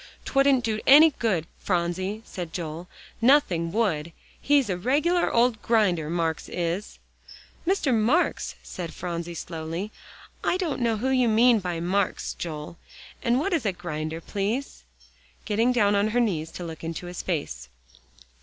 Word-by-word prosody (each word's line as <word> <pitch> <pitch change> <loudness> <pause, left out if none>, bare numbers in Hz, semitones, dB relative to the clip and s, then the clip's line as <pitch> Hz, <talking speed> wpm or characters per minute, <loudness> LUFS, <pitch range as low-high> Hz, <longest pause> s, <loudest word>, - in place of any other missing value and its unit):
"'Twouldn't 275 -2 +3
do 215 -2 -1
any 305 +4 +9
good, 190 -9 +1
Phronsie," 185 +4 -1
said 175 -3 -6
Joel, 165 0 -5 0.3
"nothing 210 - +3
would. 170 -7 0 0.3
He's 285 -2 +3
a 185 - -1
regular 295 - +1
old 235 -2 +2
grinder, 185 -9 +2
Marks 165 -2 -1
is." 175 +3 -3 0.7
"Mr. 350 -8 +2
Marks," 235 +10 +1
said 170 -3 -7
Phronsie 170 -1 -4
slowly, 165 +5 -5 0.5
"I 360 - +1
don't 335 -8 -2
know 230 -2 +1
who 255 +5 -1
you 255 -3 +3
mean 230 +1 +5
by 175 -3 -3
Marks, 185 +3 -1
Joel. 155 -1 -6 0.4
And 235 +1 +2
what 375 +6 -1
is 325 - +1
a 205 - +1
grinder, 160 -2 -5
please?" 205 - -3 0.6
getting 225 +4 +2
down 210 -5 +3
on 200 +1 +2
her 230 +3 +1
knees 170 -9 0
to 180 - -6
look 165 -2 -8
in 165 0 -4
his 175 +1 -6
face. - - -4
200 Hz, 150 wpm, -26 LUFS, 170-240 Hz, 0.7 s, any